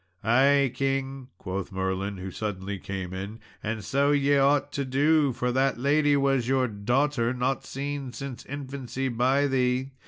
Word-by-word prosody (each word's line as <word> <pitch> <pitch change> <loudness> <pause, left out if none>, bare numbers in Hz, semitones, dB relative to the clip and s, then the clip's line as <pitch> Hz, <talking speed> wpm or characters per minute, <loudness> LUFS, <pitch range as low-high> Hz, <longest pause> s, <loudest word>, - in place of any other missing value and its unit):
"Ay, 135 +4 +4
king," 135 -1 -2
quoth 95 0 -5
Merlin, 95 +1 -2
who 95 +1 -6
suddenly 100 -1 -4
came 95 -2 -5
in, 100 +4 -6 0.2
"and 110 -1 -3
so 140 +5 +2
ye 145 0 +3
ought 140 +1 +3
to 140 - -2
do, 145 +2 +3
for 125 0 -1
that 135 +1 +1
lady 145 +3 +3
was 135 -3 +1
your 130 -1 +2
daughter, 120 +4 0
not 125 +2 -1
seen 140 -1 -4
since 125 0 -7
infancy 135 -1 -4
by 130 +4 +2
thee. 130 0 0
130 Hz, 155 wpm, -27 LUFS, 110-140 Hz, 0.2 s, Ay